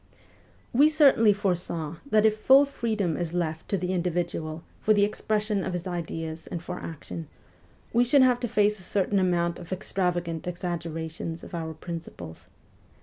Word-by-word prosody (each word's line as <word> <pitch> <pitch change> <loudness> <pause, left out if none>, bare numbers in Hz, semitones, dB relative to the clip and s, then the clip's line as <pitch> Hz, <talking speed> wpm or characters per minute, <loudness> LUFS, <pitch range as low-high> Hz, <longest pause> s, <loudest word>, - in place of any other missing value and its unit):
We 285 +5 +6
certainly 275 -8 +5
foresaw 175 -5 -1
that 215 -2 +4
if 215 -1 +4
full 265 +6 +6
freedom 220 - -1
is 170 0 -3
left 160 -2 -2
to 200 - +1
the 180 +1 -2
individual 170 -2 -2 0.2
for 215 - +3
the 205 - +4
expression 210 -1 0
of 185 - -3
his 175 0 -3
ideas 165 -2 -5
and 175 - -4
for 165 - -6
action, 165 0 -7 0.7
we 240 +1 +5
should 260 +3 +5
have 250 -1 +4
to 245 - -2
face 210 -2 +2
a - - -10
certain 195 +2 +1
amount 175 -2 +1
of 175 0 -11
extravagant 175 -3 -2
exaggerations 165 -2 -4
of - - -11
our 160 -2 -4
principles. 160 - -8
180 Hz, 160 wpm, -27 LUFS, 165-210 Hz, 0.7 s, We